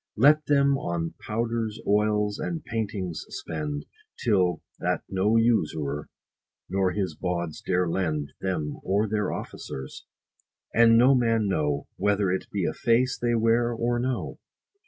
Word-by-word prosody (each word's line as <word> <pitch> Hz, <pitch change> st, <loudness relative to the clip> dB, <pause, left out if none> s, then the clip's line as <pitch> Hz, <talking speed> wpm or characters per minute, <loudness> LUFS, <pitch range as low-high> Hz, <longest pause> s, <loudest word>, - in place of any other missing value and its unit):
Let 150 Hz, +6 st, +5 dB
them 140 Hz, -1 st, +3 dB
on 85 Hz, -1 st, -2 dB
powders, 115 Hz, 0 st, -2 dB
oils, 105 Hz, 0 st, +2 dB
and 165 Hz, -2 st, -4 dB
paintings 105 Hz, -7 st, -3 dB
spend, 75 Hz, -2 st, -4 dB, 0.3 s
Till 90 Hz, -7 st, +1 dB, 0.2 s
that -, -, -1 dB
no 100 Hz, +4 st, +2 dB
usurer, 80 Hz, -11 st, +1 dB, 0.6 s
nor 95 Hz, -1 st, +1 dB
his 95 Hz, -1 st, -2 dB
bawds 85 Hz, -3 st, -3 dB
dare 90 Hz, -1 st, +1 dB
lend 80 Hz, -5 st, -1 dB
Them 80 Hz, -6 st, -2 dB
or 100 Hz, +3 st, +1 dB
their 105 Hz, 0 st, -1 dB
officers; 65 Hz, 0 st, -7 dB, 0.7 s
and 115 Hz, 0 st, +6 dB
no 125 Hz, +3 st, +6 dB
man 115 Hz, -4 st, +2 dB
know, 75 Hz, -6 st, 0 dB
70 -, -, -9 dB
Whether 100 Hz, -2 st, +2 dB
it 95 Hz, -, -2 dB
be 100 Hz, -4 st, -1 dB
a -, -, 0 dB
face 120 Hz, +2 st, +2 dB
they 120 Hz, -1 st, 0 dB
wear 115 Hz, +1 st, +3 dB
or 120 Hz, +1 st, 0 dB
no. 125 Hz, 0 st, -2 dB
105 Hz, 140 wpm, -26 LUFS, 90-115 Hz, 0.7 s, and